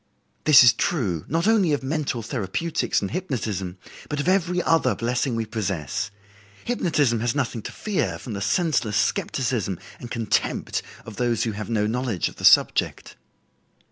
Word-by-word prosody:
This 150 -4 +9
is 120 -3 +7
true, 110 - -1
not 165 +5 0
only 200 -8 +4
of 145 - -1
mental 135 -4 -2
therapeutics 115 - -1
and 100 - -3
hypnotism, 110 - -3 0.3
but 150 - -2
of 145 - -2
every 180 -1 +2
other 145 -9 +2
blessing 120 +3 -1
we 115 0 -1
possess. 100 - -3 0.6
Hypnotism 155 - +1
has 120 +2 -1
nothing 130 -5 -1
to - - -7
fear 210 -3 -2
from 120 - -7
the 100 - -4
senseless 110 - +1
skepticism 105 -2 -1 0.2
and 120 - -8
contempt 115 -4 -1 0.2
of 110 -3 -10
those 120 -3 +1
who 115 - -1
have 105 +1 -6
no 110 -2 +1
knowledge 115 -4 -1
of - - -16
the - - -3
subject." - - +4
120 Hz, 160 wpm, -24 LUFS, 105-150 Hz, 0.6 s, This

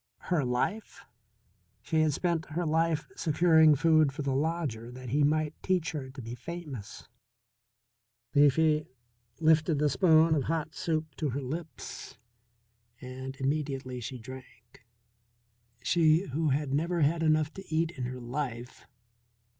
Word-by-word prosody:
Her 165 -5 +3
life? 125 - -2 0.8
She 160 +5 +1
had 155 -1 +3
spent 170 +1 -1
her 175 +2 -1
life 160 0 +1
securing 160 -1 +4
food 155 0 +4
for 145 +2 -5
the 140 -1 0
lodger 140 -6 -2
that 125 0 -9
he 145 +5 +1
might 155 +1 +1
teach 180 -3 0
her 140 -5 -5
to 130 0 -9
be 115 +1 -6
famous. 135 -5 -8 1.3
Leafy 150 +2 +4 0.5
lifted 160 -1 +3
the 150 0 +2
spoon 160 +3 +5
of 145 -4 0
hot 160 -2 -2
soup 155 -2 -2
to 155 - -1
her 135 +3 -3
lips 155 +4 -7 0.8
and 130 +1 -7
immediately 135 -2 -2
she 130 +3 -6
drank 120 -2 -13 1.0
she 165 +1 +3
who 155 +3 0
had 140 0 -1
never 170 +4 0
had 160 +3 +2
enough 155 -1 +2
to 195 - -9
eat 160 +1 +1
in 130 -7 -5
her 125 +1 -5
life. 125 -1 -5
150 Hz, 140 wpm, -29 LUFS, 130-160 Hz, 1.3 s, spoon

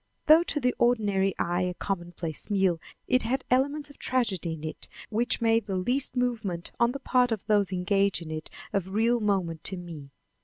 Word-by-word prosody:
Though 315 +2 +8
to 295 - -1
the 250 -2 +1
ordinary 205 -5 +2
eye 175 +1 0
a 180 -1 -1
commonplace 175 -4 -4
meal, 190 -4 +2 0.3
it 255 0 +4
had 260 +4 -1
elements 285 +3 +1
of - - -20
tragedy 200 -10 0
in 155 -1 -8
it 155 - -6 0.2
which 235 +3 0
made 225 -1 +2
the 195 - -2
least 250 +9 +1
movement 220 -9 -2
on 235 0 +4
the 275 - -5
part 250 -2 +2
of 220 -3 -2
those 205 -3 +2
engaged 195 +1 +1
in 160 - -8
it 155 0 -5 0.2
of 190 -2 -1
real 235 +2 +3
moment 185 -7 -1
to 190 - -3
me. 165 -6 -9
200 Hz, 190 wpm, -27 LUFS, 180-245 Hz, 0.3 s, Though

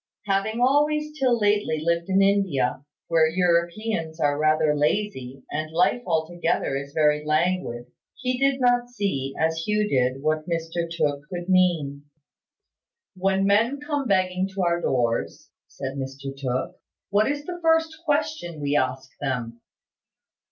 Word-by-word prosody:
Having 205 +4 0
always 300 +3 +2
till 255 -3 +3
lately 205 -6 +1
lived 170 +3 -1
in 195 +1 +4
India, 165 -11 +1 0.2
where 160 -1 +4
Europeans 170 0 0
are 145 -2 +2
rather 155 0 +2
lazy, 145 -4 -1
and 155 +1 -3
life 180 +8 +2
altogether 165 -3 0
is 140 +1 -5
very 150 0 +2
languid, 155 -6 0 0.3
he 255 -1 -2
did 275 0 +2
not 245 -1 +2
see, 195 - -2
as 160 0 +1
Hugh 210 0 +1
did, 130 -3 0
what 155 +2 0
Mr 170 0 -2
Tooke 150 -3 -1
could 175 0 -5
mean. 165 -7 +2 1.1
"When 190 +1 +1
men 225 +8 +3
come 290 -2 -2
begging 185 -1 +1
to 195 - 0
our 170 0 +1
doors," 120 -5 -1 0.2
said 135 +1 -6
Mr 135 0 -6
Tooke, 130 -2 -3 0.3
"what 210 +3 +3
is 290 0 -5
the 350 +1 -6
first 325 -1 +2
question 300 - -1
we 145 0 -1
ask 130 -1 0
them?" 120 -4 -3
170 Hz, 140 wpm, -24 LUFS, 145-210 Hz, 1.1 s, in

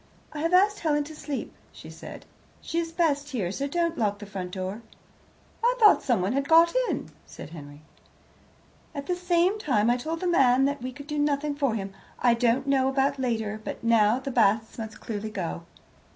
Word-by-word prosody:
"I 300 - -5
have 330 +3 0
asked 405 +3 +4
Helen 295 -2 +1
to 310 +2 -10
sleep," 290 -2 -5 0.2
she - - -12
said. - - -10 0.3
"She 335 - -3
is 330 -1 -3
best 295 -4 0
here; 210 -11 -2
so 275 +7 -3
don't 335 +2 -1
lock 205 -2 +1
the 205 - -9
front 190 -3 -6
door." 190 +4 -5 0.8
"I - - +3
thought 425 -2 +7
someone 220 -4 +1
had 275 +1 -1
got 330 +1 +6 0.2
in," - - -3 0.2
said - - -10
Henry. 145 -2 -11 1.1
"At 280 -1 -5
the 360 - -1
same 360 +3 +1
time 240 - +2
I 245 - +2
told 320 +6 -4
the - - -2
man 270 -6 +4
that 285 -1 -1
we 255 +1 -4
could 285 +2 -11
do 300 0 -3
nothing 290 0 0
for 275 -5 0
him. 195 -2 -5 0.2
I 240 -1 +3
don't 240 +3 +1
know 270 -1 +2
about 270 +1 +1
later, 220 -4 -2
but - - -6
now 230 -1 +4
the 265 +1 -5
Basts 220 -1 +2
must 220 -1 -7
clearly 215 -1 -4
go." 80 - -5
270 Hz, 195 wpm, -26 LUFS, 220-300 Hz, 1.1 s, thought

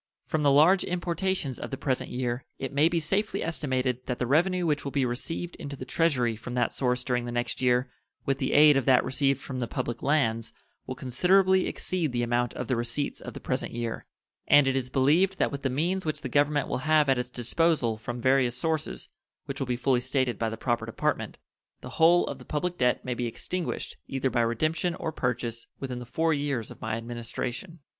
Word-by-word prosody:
From 155 - -1
the 145 - +4
large 160 +7 +5
importations 175 -5 -1
of - - -5
the 135 - -4
present 130 -2 -1
year 125 0 -2
it 135 -1 -5
may 150 +4 +4
be 170 -1 +1
safely 195 +7 -1
estimated 130 -6 -1
that 125 - -2
the 125 - -1
revenue 175 +7 +2
which 150 -3 0
will 140 - -4
be 135 -2 +1
received 165 +8 -4
into 140 0 -6
the 130 - -7
Treasury 130 -7 +1
from 120 +3 -7
that 120 -1 +1
source 125 -1 0
during 125 -1 -1
the 120 - -4
next 120 0 -2
year, 125 0 +3 0.4
with 135 0 0
the 130 - -1
aid 150 0 +7
of 135 - 0
that 130 -2 +5
received 135 +1 +1
from 130 -2 -6
the 120 - -2
public 120 0 -3
lands, 115 -7 +1 0.3
will 130 - -4
considerably 185 +9 +3
exceed 175 -6 -2
the 120 0 0
amount 120 0 0
of 125 - -4
the 130 - +1
receipts 120 +5 -2
of - - -8
the - - -6
present - - -3
year; 115 -1 -4 0.4
and 145 -1 +7
it 135 0 +1
is 130 -1 -1
believed 155 +9 +3
that - - +1
with 140 -1 -5
the 135 - 0
means 175 +8 0
which 155 -2 -3
the 130 - -4
Government 145 +2 +2
will - - -2
have 155 +1 +3
at 135 -2 +3
its 125 0 -3
disposal 125 0 +1
from 120 +2 -6
various 130 -1 +2
sources, 155 - -2 0.4
which - - -5
will 135 - -2
be 125 - 0
fully 130 0 +2
stated 130 -2 0
by 115 - 0
the 110 - -6
proper 120 -1 -1
Department, 115 - -2 0.4
the - - -8
whole 170 +2 +6
of 140 - -6
the - - -11
public 170 +6 -2
debt 125 -5 +1
may 125 - -1
be 120 0 -2
extinguished, 175 - -4
either 135 -1 -1
by 120 - +2
redemption 155 +9 0
or 165 -2 -3
purchase, 120 -4 -3
within 130 -2 -4
the 125 - -9
four 160 +5 +1
years 140 -6 -2
of - - -13
my 110 0 -2
Administration. 120 +7 -5
130 Hz, 215 wpm, -27 LUFS, 120-155 Hz, 0.4 s, aid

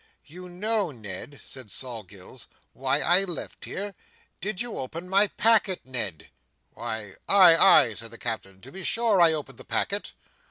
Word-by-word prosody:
"You 180 +4 -11
know, 205 +2 0
Ned," 110 +2 -8
said 130 -5 -8
Sol 120 +3 -3
Gills, 95 -1 -13 0.3
"why - - 0
I 180 +3 +6
left 175 -4 -5
here. 200 +1 -5 0.5
Did 200 -1 -4
you 240 0 -3
open 165 +7 -7
my 195 +3 +5
packet, 210 -3 +2
Ned?" 110 -10 -4 0.4
"Why, 105 -3 -6
ay, 185 -4 +7
ay," 120 -7 +6
said 115 +2 -6
the 115 - -12
Captain. 95 -5 -6
"To 135 - -13
be 190 +3 -9
sure, 225 -4 +2
I 170 -1 +6
opened 140 -5 -7
the - - -10
packet." 200 +1 -2
165 Hz, 165 wpm, -25 LUFS, -, 0.5 s, ay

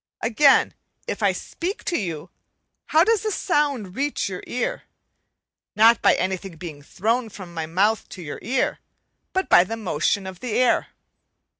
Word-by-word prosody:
Again, 270 +5 +4 0.3
if - - -4
I - - +4
speak 370 +4 -5
to 345 - -1
you, 165 - -4 0.6
how 320 +1 +5
does 445 +1 +2
the 435 - -1
sound 280 - 0
reach 280 -6 -1
you 185 -1 -6
ear? 250 - -3 0.9
Not 225 +3 +6
by - - +5
anything 190 -1 -3
being 155 -4 -8
thrown 225 - -1
from 185 -4 -10
my 160 -2 -4
mouth 200 +6 +1
to 180 - -9
your 145 - -6
ear, 255 +6 -1 0.5
but 380 0 -1
by 175 - +7
the 225 +5 -5
motion 195 -1 0
of 190 -1 -8
the 245 -2 -4
air. 250 +1 +2
215 Hz, 160 wpm, -23 LUFS, 180-265 Hz, 0.9 s, by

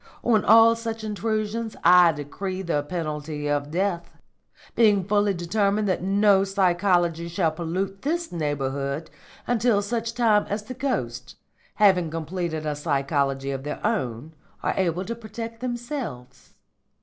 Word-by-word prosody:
On 225 -3 +3
all 225 +1 +7
such 225 -1 -5
intrusions 215 +1 -2
I 175 0 +7
decree 185 +6 -5
the 165 -5 0
penalty 150 -2 -4
of 145 0 -1
death, 175 0 -1 0.7
being 210 -4 +4
fully 205 0 +2
determined 200 +4 0
that 185 - 0
no 195 +1 +4
psychology 175 -3 +1
shall 170 -1 0
pollute 185 +4 -3
this 335 +4 -2
neighbourhood 140 -2 -3 0.3
until 235 -3 +2
such 230 +2 -3
time 220 -4 +3
as 205 +1 -2
the 255 - -7
ghosts, 235 - -3 0.4
having 190 -5 +4
completed 165 0 -4
a 150 -1 -1
psychology 140 -2 -1
of 135 -1 -4
their 150 - -5
own, 155 - -2 0.3
are - - +1
able 185 0 0
to 230 - -3
protect 230 0 -8
themselves. 240 - -6
185 Hz, 135 wpm, -24 LUFS, 155-215 Hz, 0.7 s, all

